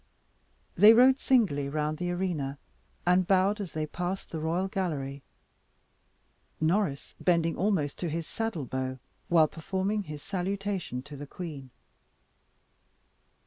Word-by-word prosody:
They 210 +5 +8
rode 260 +3 +6
singly 175 - +2
round 150 +1 -2
the 175 0 -1
arena, 175 -7 -2 0.5
and 180 0 +3
bowed 195 +2 +3
as 185 -5 -6
they 155 -1 -1
passed 180 +5 -4
the 165 - -3
royal 170 +4 0
gallery, 145 -8 -3 1.4
Norris 160 -3 0
bending 170 -2 +2
almost 175 -7 0
to 175 - -2
his 165 +1 -3
saddle 225 -10 -3
bow 130 +1 -3 0.3
while 165 -3 +6
performing 190 +6 -2
his 150 -2 -8
salutation 195 - -3
to 145 +1 -10
the 145 +1 -8
queen. 145 -6 -7
175 Hz, 125 wpm, -29 LUFS, 150-195 Hz, 1.4 s, They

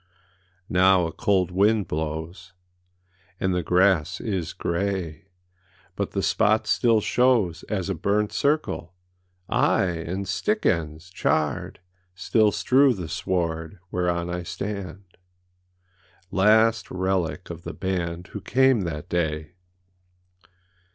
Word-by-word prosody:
Now 95 0 +4
a 80 - -3
cold 95 -1 +1
wind 100 +1 +2
blows, 80 +5 -5 0.9
And 95 -1 0
the 90 - 0
grass 90 -2 +2
is 95 -6 -3
gray, 90 -2 -3 0.7
But - - -2
the - - -1
spot 110 +1 +2
still 110 +1 +3
shows 110 -10 +2
As 95 -4 -2
a 95 - -1
burnt 105 +5 0
circleâaye, 145 - 0 0.6
And 90 +2 0
stick 210 - -1
ends, 80 -1 -1
charred, 75 -4 -1 0.3
Still 105 +3 +2
strew 130 +3 +3
the 90 -5 -6
sward 85 -1 -2
Whereon 85 -1 -1
I 90 0 -3
stand, 95 +1 -6 1.3
Last 110 +3 +3
relic 95 -1 -2
of 85 -1 -8
the - - -7
band 90 -2 -3
Who 105 - -7
came 130 +2 +3
that 75 -3 -5
day! 80 -2 -2
95 Hz, 110 wpm, -24 LUFS, 85-105 Hz, 1.3 s, Now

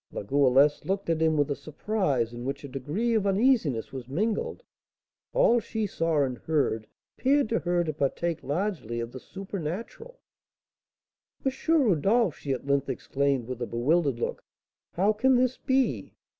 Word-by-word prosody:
La - - -5
Goualeuse 140 +4 +3
looked 195 -2 -1
at 160 -1 0
him 160 -1 +3
with 145 0 +1
a - - 0
surprise 150 - -1
in 120 0 -7
which 140 +2 -4
a - - -6
degree 150 - -2
of 210 -3 +2
uneasiness 195 - +2
was 130 -3 -6
mingled; 210 - -2 0.7
all - - +4
she 220 -1 -3
saw 165 -6 +1
and 130 -3 -3
heard 135 -9 0 0.3
appeared 280 0 +3
to 230 - +1
her 175 0 +1
to 155 -2 -3
partake 155 +4 -1
largely 150 - -2
of 115 0 -4
the 130 - -8
supernatural. 195 - -6 1.3
"M. 270 - +3 0.2
Rodolph," 225 - +3
she 140 - -5
at 130 - -3
length 140 0 +1
exclaimed, 140 -3 0
with 125 -1 -6
a 120 - -2
bewildered 140 +3 +1
look, - - -3 0.5
"how 200 +5 +2
can 260 +5 +3
this 255 0 +2
be? 260 - 0
160 Hz, 160 wpm, -27 LUFS, 135-215 Hz, 1.3 s, all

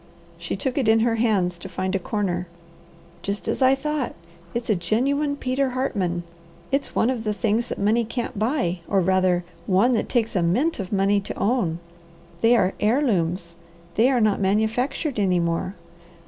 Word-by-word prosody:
She - - -3
took 265 0 -2
it 255 - 0
in 225 0 +5
her 230 0 +2
hands 190 -7 +1
to 190 - -8
find 185 +1 -2
a 195 - +1
corner. 185 -3 -2 0.7
"Just 200 +1 -4
as - - -1
I 260 +1 +6
thought! 295 -1 -2 0.4
It's 235 0 -2
a 215 - +3
genuine 280 - 0
Peter 265 0 0
Hartman! 180 -9 -1 0.5
It's 275 +1 -1
one 240 - +3
of 240 -4 -3
the 210 -1 -1
things 225 +2 0
that - - -4
money 215 +4 +2
can't 230 -2 -4
buy, 220 - 0
or, 195 - +2
rather, 185 -1 +2 0.2
one 200 +6 +4
that 235 - 0
takes 230 -3 0
a 180 - +2
mint 235 - +1
of 190 -2 -5
money 200 0 +3
to 200 - -6
own. 200 -6 +1 0.6
They 230 +2 +5
are 190 -4 +2
heirlooms. 185 - +1 0.4
They 230 +7 +4
are 260 -2 +2
not 215 -3 +2
manufactured 225 - 0
any 185 -3 +2
more. 170 +3 -1
215 Hz, 175 wpm, -24 LUFS, 185-245 Hz, 0.7 s, I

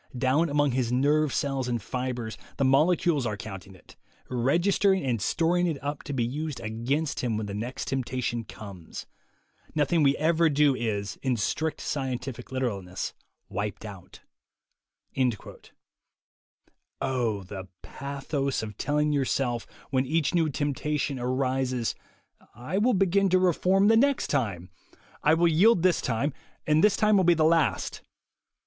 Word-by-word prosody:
Down 135 +6 +2
among 145 -1 +2
his 120 -1 0
nerve 145 +3 +2
cells 135 -3 -1
and 120 -1 -1
fibres 125 0 -4 0.2
the 135 - +2
molecules 150 0 +3
are 105 -2 -3
counting 95 -2 -9
it, - - -18 0.4
registering 175 - +2
and 120 -5 0
storing 175 - +1
it 160 -4 -1
up 145 0 -3
to - - -5
be 125 -3 0
used 150 +4 -4
against 125 +8 -2
him 115 -4 -1
when 110 - -3
the 100 - -6
next 120 +6 -4
temptation 125 -2 -2
comes. 100 -6 -9 0.7
Nothing 155 +2 +2
we 140 -1 +4
ever 165 +1 +3
do 145 -1 +4
is, 105 -4 -3
in 130 -3 0
strict 155 +9 -1
scientific 130 -3 -4
literalness, 100 -8 -3 0.3
wiped 100 +2 -4
out." 95 -4 -11 2.8
Oh, 120 -7 -1
the 95 0 -8 0.2
pathos 140 -1 -3
of 105 -2 -8
telling 150 +1 +1
yourself, 130 -4 0 0.2
when 130 -1 +1
each 155 +1 +1
new 165 -3 +2
temptation 145 -1 -2
arises: 130 -1 0 0.6
"I 130 - -2
will 240 +2 +3
begin 195 +1 +3
to 185 - +4
reform 185 +2 +3
the 225 +1 +6
next 275 +2 +2
time. 100 - -1 0.5
I 155 +2 +4
will 170 +1 +3
yield 175 +4 +4
this 185 -2 +3
time, 130 +4 -1 0.3
and 155 +1 +3
this 210 - +4
will 215 -3 +4
be 175 -1 +5
the 155 - +2
last." 160 -1 +1
135 Hz, 140 wpm, -27 LUFS, 120-160 Hz, 2.8 s, the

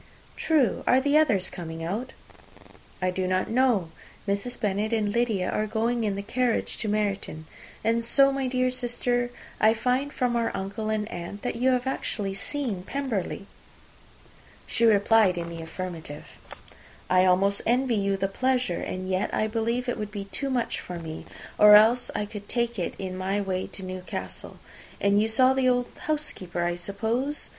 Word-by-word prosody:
"True. 305 -6 +2
Are 255 - +6
the 285 +2 +1
others 225 -12 +3
coming 165 -2 -6
out?" 215 +10 -3 0.9
"I 185 - +2
do 185 0 -2
not 185 +3 0
know. 230 -9 +2 0.4
Mrs. 200 +5 -2
Bennet 210 0 0
and 210 -2 +1
Lydia 225 -6 +1
are 215 - 0
going 230 +2 0
in 205 -2 0
the 200 - -4
carriage 240 +2 0
to 220 - -3
Meryton. 200 -6 -2 0.4
And 230 +1 +1
so, 275 +4 +4
my 270 -1 -1
dear 255 0 +1
sister, 245 -1 0 0.3
I 220 +1 +5
find, 255 +5 0
from 250 -4 0
our 230 -1 +1
uncle 200 +3 -3
and 215 -1 -1
aunt, 175 +3 -7
that - - -2
you 255 +2 +3
have 250 -1 +1
actually 210 -6 -2
seen 225 -1 -3
Pemberley." 220 -4 -3 1.2
She 235 - +1
replied 210 -3 +4
in 170 -1 -3
the 165 -1 -7
affirmative. 165 -3 -6 0.8
"I 185 0 +4
almost 195 +2 +3
envy 250 +1 +2
you 200 -2 +1
the 195 - 0
pleasure, 250 -2 0
and 185 0 -4
yet 185 0 0
I 215 - +1
believe 230 +3 -1
it 245 - -2
would 210 -1 -3
be 205 -2 -6
too 200 +8 -4
much 250 -3 -1
for 180 - -7
me, 160 -1 -7 0.3
or 210 0 +10
else 225 +4 +5
I 210 - -1
could 205 -1 -9
take 235 -2 -1
it 175 - -2
in 185 -1 -5
my 190 +2 -1
way 190 -2 -2
to 190 - -8
Newcastle. 185 0 -6 0.4
And 200 +1 +3
you 220 - +1
saw 255 +4 +5
the 265 -1 +3
old 245 -1 +1 0.2
housekeeper, 190 - -2
I 175 0 +1
suppose? 220 +10 -2
215 Hz, 175 wpm, -26 LUFS, 190-245 Hz, 1.2 s, or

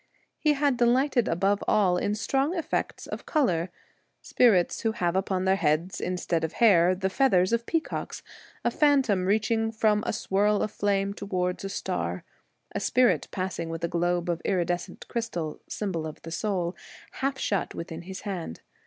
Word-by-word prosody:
He 305 -1 +3
had 285 -3 +1
delighted 245 +1 +3
above 195 +4 +1
all 195 -4 +3
in 205 +3 0
strong 275 - 0
effects 330 - -2
of - - -7
colour: 185 - +1 0.5
spirits 200 -8 +3
who 225 -1 0
have 175 -5 -1
upon 190 -1 0
their 190 +1 +3
heads 160 +3 0
instead 175 -2 -1
of 160 - -2
hair 185 -5 +5
the 190 +1 -1
feathers 190 -3 +3
of 235 0 0
peacocks; 330 -1 -3 0.4
a - - +3
phantom 270 - +3
reach 215 +3 +1
ing 225 0 +1
from 215 -1 +2
a - - +1
swirl 205 0 +1
of 215 - -2
flame 200 -1 0
towards 185 -3 -2
a 195 - -3
star; 195 - -3 0.5
a - - -1
spirit 250 -1 +2
passing 185 -3 -3
with 165 0 -5
a - - +2
globe 175 +1 0
of 170 -1 -1
iridescent 175 -2 -2
crystal 195 -10 -3
— - - -37
symbol 175 -7 -3
of 155 - -9
the 165 - -8
soul 180 -1 -1 0.2
— - - -20
half 270 0 0
shut 200 -7 -1
within 165 0 -6
his 190 +2 -8
hand. 180 - -5
195 Hz, 175 wpm, -27 LUFS, 175-225 Hz, 0.5 s, hair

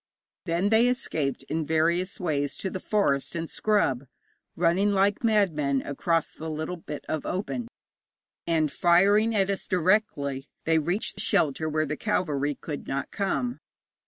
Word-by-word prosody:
Then 175 +3 +1
they 225 +2 +5
escaped 155 - -1
in 160 +4 -2
various 165 +4 +1
ways 145 -6 -1
to 190 - -3
the 185 - -4
forest 175 -11 0
and 165 -1 -3
scrub, 145 - 0 0.5
running 180 +4 +2
like 200 +2 +2
madmen 160 - +2
across 165 +3 0
the 160 +1 -6
little 155 +3 -3
bit 150 -3 -8
of 155 -1 -2
open, 215 +6 -3 0.8
and 160 -3 +2
firing 200 +6 +4
at 195 -1 +2
us 195 - -3
directly 170 -7 +1 0.2
they 160 0 +3
reached 175 +7 -2
shelter 155 +1 +1
where 155 0 0
the 150 +1 -3
cavalry 150 -9 0
could 150 -3 -7
not 135 +1 -3
come. 240 +5 -1
170 Hz, 145 wpm, -27 LUFS, 150-200 Hz, 0.8 s, they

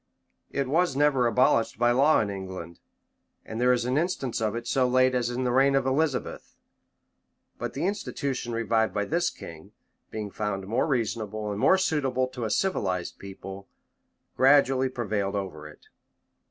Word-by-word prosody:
It 140 -1 -2
was 165 +1 +1
never 140 -4 +3
abolished 115 -1 +2
by 120 0 +3
law 140 +5 +4
in 105 -2 -2
England; 95 -3 -7 0.7
and 110 +2 -5
there 125 0 +4
is 120 -1 +1
an 130 +4 +1
instance 155 -9 -2
of 110 0 0
it 120 0 -5
so 130 +1 +2
late 130 +1 +3
as 125 -2 0
the 125 +1 -1
reign 135 +2 +4
of 135 -1 +2
Elizabeth: 135 +1 -1 1.0
but - - -5
the - - -1
institution 140 - -3
revived 115 -1 0
by 105 0 0
this 170 +7 0
king, 80 -1 -11 0.4
being 105 -2 -5
found 100 -2 -3
more 115 +9 0
reasonable 110 -5 -2
and 100 - -4
more 190 - +5
suitable 135 -8 0
to 125 -2 -5
a - - -2
civilized 95 - -1
people, 95 0 -9 0.7
gradually 135 0 +4
prevailed 105 -6 -2
over 90 -7 -5
it. 75 - -16
120 Hz, 160 wpm, -27 LUFS, 105-135 Hz, 1.0 s, more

